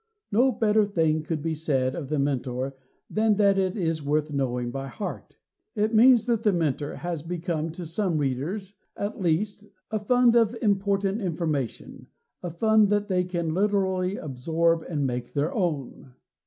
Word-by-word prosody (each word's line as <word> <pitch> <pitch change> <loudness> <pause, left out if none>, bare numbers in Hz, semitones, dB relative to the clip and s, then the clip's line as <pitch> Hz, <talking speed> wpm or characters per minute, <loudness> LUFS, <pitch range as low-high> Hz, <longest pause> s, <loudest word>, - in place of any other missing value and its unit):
No 245 +6 +4
better 215 -1 +3
thing 160 -6 +1
could 155 -1 -4
be 165 -1 -1
said 135 -5 0
of 145 -6 -6
The 155 - 0
Mentor 135 -1 -1 0.3
than 215 0 +2
that 200 -1 +3
it 190 +2 0
is 165 -4 -1
worth 150 +1 0
knowing 125 -3 -1
by 135 +1 -5
heart. 200 - -7 0.4
It 215 +1 0
means 235 +1 +6
that 235 -3 +1
The 215 -2 +3
Mentor 150 -4 -1
has 175 -3 -4
become 165 -1 -3
to 175 +1 -7
some 170 +1 -1
readers 155 +9 -2 0.2
at 205 0 -4
least 200 +5 -1 0.2
a 215 - 0
fund 245 +3 +4
of 230 0 +3
important 200 0 +1
information 160 - -3 0.3
a 175 - -4
fund 215 +4 +3
that 205 0 0
they 180 -1 +2
can 170 -3 -2
literally 190 -1 +1
absorb 165 +4 0
and 145 -5 -1
make 125 -1 -3
their 145 +2 0
own. 150 - -3
175 Hz, 165 wpm, -26 LUFS, 150-205 Hz, 0.4 s, means